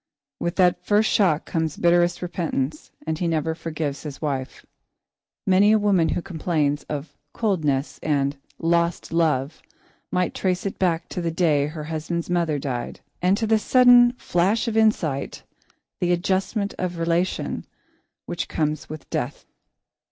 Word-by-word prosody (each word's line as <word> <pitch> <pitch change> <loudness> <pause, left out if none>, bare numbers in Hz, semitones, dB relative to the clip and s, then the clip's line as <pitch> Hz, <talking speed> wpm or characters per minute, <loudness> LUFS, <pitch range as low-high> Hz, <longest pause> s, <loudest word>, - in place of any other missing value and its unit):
With 170 - -2
that 180 -1 +3
first 210 +3 +3
shock 175 -7 +2
comes 160 -2 -2
bitterest 175 0 +3
repentance 155 -5 -3 0.2
and 160 0 -2
he 175 - 0
never 160 -1 0
forgives 155 -3 -4
his 145 -3 -7
wife. 135 -4 -4 0.8
Many 195 +2 +5
a - - +5
woman 200 -6 +2
who 175 - -2
complains 155 -5 -1
of 150 +1 -5 0.2
"coldness" 155 - 0
and 140 -2 0 0.2
"lost 170 0 0
love" 155 -3 +1 0.5
might 180 -1 0
trace 185 0 -1
it 195 - -4
back 170 -3 +1
to 180 - -4
the 170 - -1
day 155 -4 +2
her 155 0 -6
husband's 165 +2 -3
mother 170 -4 +1
died, 130 -4 -4 0.2
and 185 +3 +3
to 225 - -1
the 220 0 +3
sudden 245 +1 +6
flash 205 0 0
of 225 - -1
insight, 180 -11 +1 0.6
the 175 -1 +1
adjustment 195 +3 0
of 180 -1 -2
relation, 170 +2 -1 0.6
which 175 - -4
comes 155 -1 -2
with 155 -1 -8
death. - - -3
170 Hz, 145 wpm, -23 LUFS, 155-185 Hz, 0.8 s, sudden